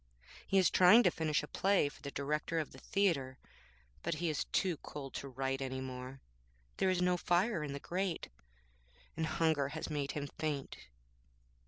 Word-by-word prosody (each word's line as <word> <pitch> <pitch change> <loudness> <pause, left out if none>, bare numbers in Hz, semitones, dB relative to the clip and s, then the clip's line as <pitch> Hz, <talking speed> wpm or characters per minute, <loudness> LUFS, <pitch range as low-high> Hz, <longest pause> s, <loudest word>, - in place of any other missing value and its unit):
He 195 - +2
is 185 - +5
trying 205 +7 +7
to - - +4
finish 155 -2 0
a - - -6
play 195 -3 +2
for 145 - -10
the 140 - -5
Director 150 +4 -2
of 155 -2 -2
the 130 - -12
Theatre, 145 -11 0 0.6
but 170 -1 -1
he 170 +1 -1
is 150 - -1
too 180 -5 0
cold 140 -2 -8
to 140 - -5
write 135 +1 -2
any 130 0 -3
more. 130 0 -7 0.6
There 190 - +2
is 180 -1 +2
no 180 0 +3
fire 175 0 +1
in 145 -2 -4
the 140 - -4
grate, 180 +3 -2 0.9
and 160 0 -1
hunger 160 -4 +2
has 155 +2 -5
made 145 -2 -2
him 145 -1 -3
faint.' 145 - -3
150 Hz, 180 wpm, -34 LUFS, 140-175 Hz, 0.9 s, trying